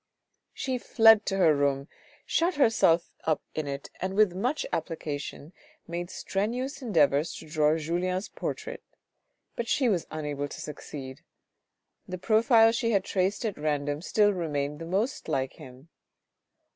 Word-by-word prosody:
She 260 Hz, -2 st, -3 dB
fled 225 Hz, -2 st, +5 dB
to 195 Hz, -, 0 dB
her 160 Hz, -5 st, +5 dB
room, 140 Hz, 0 st, 0 dB, 0.4 s
shut 345 Hz, +2 st, +1 dB
herself 225 Hz, -, +3 dB
up 155 Hz, -2 st, +1 dB
in 155 Hz, -2 st, -3 dB
it, 140 Hz, 0 st, -5 dB
and 190 Hz, +1 st, -2 dB
with 210 Hz, -3 st, +4 dB
much 250 Hz, -, -1 dB
application 150 Hz, 0 st, -4 dB, 0.3 s
made 175 Hz, +1 st, -4 dB
strenuous 250 Hz, +11 st, -3 dB
endeavours 155 Hz, -, +2 dB
to 160 Hz, -, -10 dB
draw 155 Hz, 0 st, +2 dB
Julien's 180 Hz, +4 st, -1 dB
portrait, -, -, -5 dB, 0.7 s
but 235 Hz, -, -3 dB
she 255 Hz, 0 st, +2 dB
was 180 Hz, -6 st, 0 dB
unable 145 Hz, -2 st, -3 dB
to -, -, -9 dB
succeed; 135 Hz, -3 st, -8 dB, 0.9 s
the 185 Hz, -, -5 dB
profile 225 Hz, +3 st, +5 dB
she 230 Hz, 0 st, 0 dB
had 200 Hz, -4 st, +2 dB
traced 195 Hz, +4 st, -1 dB
at 210 Hz, -7 st, -3 dB
random 145 Hz, -1 st, -1 dB
still 205 Hz, +2 st, +3 dB
remained 150 Hz, -4 st, -2 dB
the 165 Hz, -, -6 dB
most 200 Hz, +10 st, -1 dB
like 130 Hz, 0 st, -1 dB
him. 135 Hz, 0 st, -13 dB
175 Hz, 145 wpm, -28 LUFS, 150-220 Hz, 0.9 s, fled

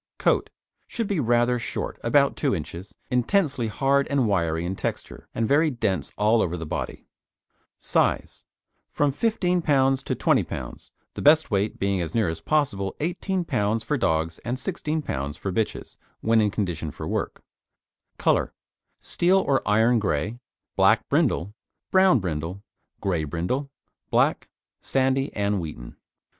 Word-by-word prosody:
COAT -, -, +1 dB, 0.4 s
Should 230 Hz, -, -3 dB
be 200 Hz, -4 st, -1 dB
rather 120 Hz, -1 st, +2 dB
short -, -, -4 dB
(about -, -, +3 dB
2 -, -, 0 dB
inches), 90 Hz, +4 st, -7 dB, 0.2 s
intensely 130 Hz, -, +1 dB
hard 140 Hz, +5 st, +1 dB
and 135 Hz, -4 st, +1 dB
wiry 85 Hz, -4 st, 0 dB
in 95 Hz, +2 st, -2 dB
texture, -, -, -5 dB
and 115 Hz, -, 0 dB
very 155 Hz, +5 st, +4 dB
dense 95 Hz, -, -2 dB
all 110 Hz, +2 st, +3 dB
over 90 Hz, -2 st, -1 dB
the 80 Hz, -, -5 dB
body. -, -, -5 dB, 0.7 s
SIZE -, -, 0 dB, 0.4 s
From 145 Hz, -1 st, +1 dB
15 180 Hz, +1 st, +1 dB
lb. 135 Hz, -3 st, +2 dB
to -, -, -2 dB
20 -, -, +2 dB
lb.; -, -, -8 dB, 0.2 s
the -, -, -6 dB
best 155 Hz, 0 st, +5 dB
weight 100 Hz, +1 st, 0 dB
being 100 Hz, -1 st, 0 dB
as 80 Hz, -2 st, -4 dB
near 110 Hz, -6 st, +2 dB
as 80 Hz, 0 st, -5 dB
possible 100 Hz, -, 0 dB
18 180 Hz, +3 st, -2 dB
lb. 110 Hz, -3 st, 0 dB
for 145 Hz, -, -1 dB
dogs, 80 Hz, -, 0 dB
and 120 Hz, +2 st, -3 dB
16 155 Hz, +1 st, -2 dB
lb. 70 Hz, -, -4 dB
for 95 Hz, -, -3 dB
bitches 110 Hz, +3 st, -3 dB, 0.2 s
when 115 Hz, 0 st, +3 dB
in 105 Hz, -, +2 dB
condition 90 Hz, -7 st, -3 dB
for -, -, -7 dB
work. -, -, -3 dB, 0.7 s
COLOUR -, -, +1 dB, 0.5 s
Steel 180 Hz, +2 st, +2 dB
or 140 Hz, -8 st, +2 dB
iron 110 Hz, +3 st, +4 dB
grey, 105 Hz, +3 st, -1 dB, 0.4 s
black -, -, +4 dB
brindle, 95 Hz, +5 st, +1 dB, 0.4 s
brown 190 Hz, -4 st, +5 dB
brindle, 90 Hz, +1 st, -4 dB, 0.4 s
grey 90 Hz, -5 st, 0 dB
brindle, 90 Hz, -, -2 dB, 0.4 s
black, -, -, +2 dB, 0.3 s
sandy 135 Hz, +1 st, +1 dB
and 100 Hz, -1 st, 0 dB
wheaten. 75 Hz, -7 st, -8 dB
115 Hz, 150 wpm, -25 LUFS, 90-140 Hz, 0.7 s, best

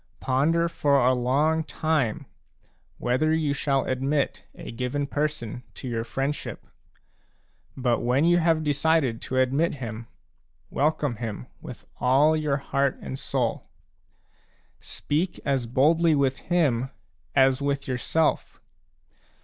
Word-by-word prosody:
Ponder 155 Hz, +6 st, +2 dB
for 140 Hz, -5 st, +2 dB
a 130 Hz, -, +5 dB
long 145 Hz, +6 st, +1 dB
time 155 Hz, -8 st, -1 dB, 0.7 s
whether 130 Hz, +6 st, +1 dB
you 155 Hz, -3 st, 0 dB
shall 135 Hz, -1 st, 0 dB
admit 135 Hz, +2 st, -1 dB
a -, -, -8 dB
given 125 Hz, +4 st, -2 dB
person 145 Hz, -5 st, -3 dB
to 130 Hz, -, -7 dB
your 115 Hz, -2 st, -2 dB
friendship; 135 Hz, +4 st, -4 dB, 1.1 s
but 125 Hz, -2 st, +1 dB
when 125 Hz, +5 st, +2 dB
you 175 Hz, +1 st, +4 dB
have 165 Hz, -2 st, +2 dB
decided 145 Hz, -4 st, +1 dB
to 130 Hz, -, -3 dB
admit 135 Hz, +6 st, +2 dB
him, 115 Hz, -3 st, -6 dB, 0.6 s
welcome 145 Hz, -4 st, 0 dB
him 110 Hz, -, -5 dB, 0.2 s
with -, -, -10 dB
all 140 Hz, +5 st, +4 dB
your 150 Hz, -3 st, 0 dB
heart 140 Hz, -1 st, 0 dB
and 130 Hz, -, -6 dB
soul. 125 Hz, -5 st, -2 dB, 1.1 s
Speak 165 Hz, +5 st, -2 dB
as 135 Hz, -4 st, 0 dB
boldly 155 Hz, +6 st, +3 dB
with 135 Hz, -2 st, +1 dB
him 135 Hz, -8 st, +2 dB, 0.5 s
as 135 Hz, 0 st, +4 dB
with 140 Hz, -1 st, -1 dB
yourself. 135 Hz, +5 st, 0 dB
140 Hz, 120 wpm, -25 LUFS, 125-155 Hz, 1.1 s, a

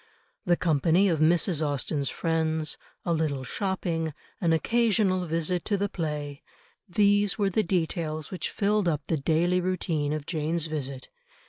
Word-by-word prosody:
The 175 Hz, -1 st, +4 dB
company 165 Hz, +4 st, +3 dB
of 165 Hz, -3 st, +1 dB
Mrs. 160 Hz, 0 st, +3 dB
Austen's 145 Hz, 0 st, 0 dB
friends, 160 Hz, -1 st, -1 dB, 0.3 s
a 170 Hz, -, +1 dB
little 150 Hz, -5 st, -1 dB
shopping, 165 Hz, -1 st, -2 dB, 0.3 s
an 170 Hz, -3 st, +2 dB
occasional 195 Hz, -1 st, +2 dB
visit 165 Hz, +2 st, 0 dB
to 205 Hz, -, +1 dB
the 200 Hz, +1 st, -1 dB
play, 150 Hz, -5 st, -4 dB, 0.5 s
these 205 Hz, +2 st, +3 dB
were 200 Hz, -2 st, +1 dB
the 215 Hz, -, +2 dB
details 165 Hz, -4 st, -2 dB
which 185 Hz, -, -3 dB
filled 205 Hz, -1 st, +1 dB
up 150 Hz, -3 st, 0 dB
the 160 Hz, -, 0 dB
daily 165 Hz, +5 st, +2 dB
routine 170 Hz, -5 st, -1 dB
of 155 Hz, -1 st, -3 dB
Jane's 160 Hz, 0 st, -1 dB
visit. 140 Hz, -4 st, -4 dB
165 Hz, 145 wpm, -27 LUFS, 155-185 Hz, 0.5 s, The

